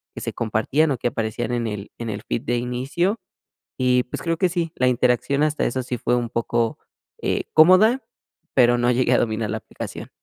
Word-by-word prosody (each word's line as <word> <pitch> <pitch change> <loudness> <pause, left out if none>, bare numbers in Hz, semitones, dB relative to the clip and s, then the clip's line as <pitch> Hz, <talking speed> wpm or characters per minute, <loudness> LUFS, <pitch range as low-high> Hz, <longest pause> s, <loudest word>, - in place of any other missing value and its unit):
que - - -6
se - - -4
compartían, 120 +8 +1
o 130 - 0
que 120 - -1
aparecían 110 +1 -3
en 120 -1 -1
el 105 -1 -6
en 115 -1 -4
el 105 +1 -5
feed 115 - -2
de 120 0 0
inicio. 135 - -1 0.6
Y, 125 -1 +3
pues, 125 - -7
creo 165 -1 0
que 185 0 +2
sí, 170 -2 -2
la 125 - +2
interacción 125 +4 +1
hasta 155 0 0
eso 130 +2 -1
sí 125 0 -4
fue 120 - -1
un 120 -2 -1
poco, 115 -1 -1 0.4
eh, - - -1
cómoda, 185 - +6 0.5
pero, 120 -2 +5
no 120 +1 +2
llegué 125 0 +2
a - - +5
dominar 110 -1 -1
la - - -2
aplicación. - - -8
125 Hz, 205 wpm, -22 LUFS, 115-150 Hz, 0.6 s, cómoda